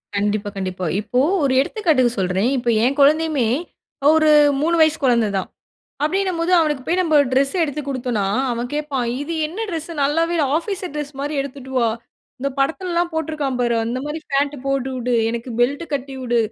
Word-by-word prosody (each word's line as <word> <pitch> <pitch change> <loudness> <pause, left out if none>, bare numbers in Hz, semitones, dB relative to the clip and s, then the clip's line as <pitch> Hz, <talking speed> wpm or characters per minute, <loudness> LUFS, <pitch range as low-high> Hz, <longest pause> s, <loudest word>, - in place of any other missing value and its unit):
கண்டிப்பா. 205 +1 0
கண்டிப்பா. 185 -1 -3 0.2
இப்போ 245 +4 -1 0.2
ஒரு 270 -2 +2
எடுத்துக்காட்டுக்கு 285 - +1
சொல்றேன். 190 +5 +1
இப்போ 240 -1 -1
என் 265 +4 +1
குழந்தையுமே, 300 -3 +3 0.7
ஒரு 310 -1 +4 0.2
அ - - -2
3 335 +3 +2
வயசு 315 0 +4
குழந்தை 235 -4 +3
தான். 190 - -3 0.6
அப்டின்னும் 370 +2 0
போது 340 +2 0
அவனுக்கு 300 -5 +1
போய் 360 +2 +1
நம்ம 330 -4 +1 0.2
டிரெஸ் 275 +4 +2
எடுத்து 300 -2 -2
குடுத்தோனா. 245 -6 -1 0.3
அவன் 240 +1 -3
கேப்பான், 290 -5 -2 0.2
இது 315 +3 -5
என்ன 380 +9 -5
டிரெஸ்சு 330 0 -5
நல்லாவே 330 +4 +1
இல்ல. 310 - +2
ஆஃபீசர் 370 0 -4
டிரெஸ் 295 -1 -4
மாரி 290 +2 -3
எடுத்துட்டு 275 -1 -7
வா. 235 -2 +3 0.5
இந்த 275 - 0
படத்துல்லாம் 345 +4 0
போட்ருக்கான் 300 -5 -2
பாரு 240 -1 +1
அந்த 235 +3 -2
மாரி 295 +2 -4
பேண்ட்டு 285 +1 +1
போட்டு 275 -1 -1
உடு, 245 0 -1 0.2
எனக்கு 235 +2 -5
பெல்ட் 275 +7 +1
கட்டி 275 -1 -3
உடு, 240 -1 +1
280 Hz, 175 wpm, -20 LUFS, 245-320 Hz, 0.7 s, ஒரு